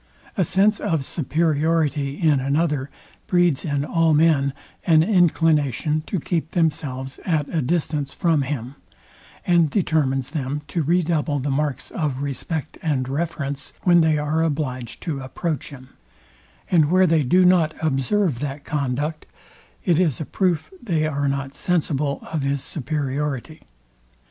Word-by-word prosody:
A 190 Hz, -, +2 dB
sense 200 Hz, +5 st, +2 dB
of 160 Hz, -9 st, -1 dB
superiority 155 Hz, -2 st, 0 dB
in 155 Hz, -4 st, +3 dB
another 140 Hz, 0 st, 0 dB, 0.4 s
breeds 175 Hz, -6 st, +2 dB
in 145 Hz, -2 st, -1 dB
all 165 Hz, -1 st, +2 dB
men 150 Hz, -3 st, +3 dB, 0.4 s
an 160 Hz, -2 st, +6 dB
inclination 155 Hz, -, +2 dB
to 190 Hz, -, -1 dB
keep 160 Hz, +1 st, -2 dB
themselves 140 Hz, -5 st, -1 dB
at 155 Hz, -4 st, 0 dB
a 165 Hz, -, 0 dB
distance 150 Hz, -1 st, -1 dB
from 165 Hz, -2 st, +1 dB
him, 130 Hz, -2 st, -4 dB, 0.7 s
and 170 Hz, -3 st, +4 dB
determines 140 Hz, -7 st, 0 dB
them 145 Hz, -1 st, -3 dB
to 165 Hz, +3 st, -1 dB
redouble 160 Hz, -2 st, +1 dB
the 140 Hz, +1 st, -2 dB
marks 135 Hz, -2 st, -2 dB
of 145 Hz, -4 st, -2 dB
respect 150 Hz, +3 st, -4 dB
and 135 Hz, -5 st, 0 dB
reverence, 140 Hz, -1 st, -3 dB
when 175 Hz, -2 st, +5 dB
they 160 Hz, -1 st, +3 dB
are 150 Hz, +2 st, 0 dB
obliged 135 Hz, -6 st, -2 dB
to 155 Hz, -5 st, -3 dB
approach 135 Hz, +3 st, -4 dB
him; 130 Hz, -3 st, -12 dB, 0.8 s
and 160 Hz, -5 st, +4 dB
where 185 Hz, +2 st, +5 dB
they 165 Hz, -2 st, +3 dB
do 180 Hz, +7 st, +4 dB
not 170 Hz, -4 st, +4 dB
observe 155 Hz, -, 0 dB
that 140 Hz, 0 st, -4 dB
conduct, 145 Hz, +1 st, -2 dB, 0.6 s
it 170 Hz, -2 st, +3 dB
is 165 Hz, -8 st, +1 dB
a 155 Hz, -, -3 dB
proof 180 Hz, -, -1 dB
they 165 Hz, -8 st, 0 dB
are 145 Hz, -2 st, -1 dB
not 135 Hz, 0 st, -2 dB
sensible 150 Hz, -5 st, -1 dB
of 155 Hz, -, 0 dB
his 140 Hz, 0 st, -1 dB
superiority. 145 Hz, +1 st, -3 dB
150 Hz, 140 wpm, -22 LUFS, 140-165 Hz, 0.8 s, an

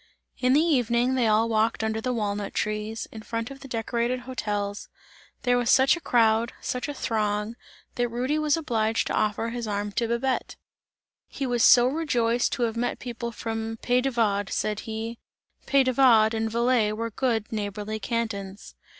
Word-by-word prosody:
In 255 Hz, 0 st, +3 dB
the 295 Hz, -, +5 dB
evening, 250 Hz, -5 st, +2 dB
they 250 Hz, -3 st, +2 dB
all 220 Hz, +1 st, +3 dB
walked 220 Hz, 0 st, +1 dB
under 220 Hz, 0 st, -1 dB
the 255 Hz, -, -1 dB
walnut 205 Hz, -3 st, -2 dB
trees, 215 Hz, +1 st, -2 dB
in 220 Hz, -, -8 dB
front 230 Hz, +2 st, -4 dB
of 275 Hz, -, -10 dB
the 275 Hz, -, -10 dB
decorated 235 Hz, +1 st, -1 dB
hôtels; 210 Hz, -5 st, -3 dB, 0.6 s
there 245 Hz, -1 st, +3 dB
was 245 Hz, -, -1 dB
such 265 Hz, +4 st, +5 dB
a -, -, -7 dB
crowd, 230 Hz, -2 st, +2 dB
such 250 Hz, +3 st, -3 dB
a 290 Hz, -, -4 dB
throng, 210 Hz, -2 st, -1 dB, 0.4 s
that 240 Hz, 0 st, -1 dB
Rudy 255 Hz, +6 st, -1 dB
was 305 Hz, 0 st, +2 dB
obliged 225 Hz, -8 st, 0 dB
to -, -, -3 dB
offer 215 Hz, +2 st, 0 dB
his 235 Hz, -1 st, -4 dB
arm 205 Hz, 0 st, -2 dB
to 230 Hz, +3 st, -1 dB
Babette. 235 Hz, +3 st, -1 dB, 0.7 s
"He 275 Hz, -, -4 dB
was 240 Hz, -2 st, +1 dB
so 240 Hz, -1 st, +7 dB
rejoiced 245 Hz, -5 st, +1 dB
to 250 Hz, -, -1 dB
have 230 Hz, -1 st, 0 dB
met 240 Hz, +1 st, -1 dB
people 235 Hz, -1 st, -5 dB
from 225 Hz, 0 st, -4 dB
Pays 250 Hz, 0 st, +3 dB
de 270 Hz, -, 0 dB
Vaud," 205 Hz, -5 st, 0 dB
said 210 Hz, 0 st, -1 dB
he, 225 Hz, +1 st, -5 dB, 0.5 s
"Pays 275 Hz, -1 st, +4 dB
de 255 Hz, -, +1 dB
Vaud 230 Hz, -4 st, +5 dB
and 225 Hz, 0 st, -1 dB
Valais 235 Hz, -1 st, +2 dB
were 230 Hz, +1 st, -3 dB
good 225 Hz, -2 st, -1 dB
neighbourly 210 Hz, 0 st, -4 dB
cantons." 205 Hz, -3 st, -4 dB
230 Hz, 180 wpm, -26 LUFS, 220-250 Hz, 0.7 s, so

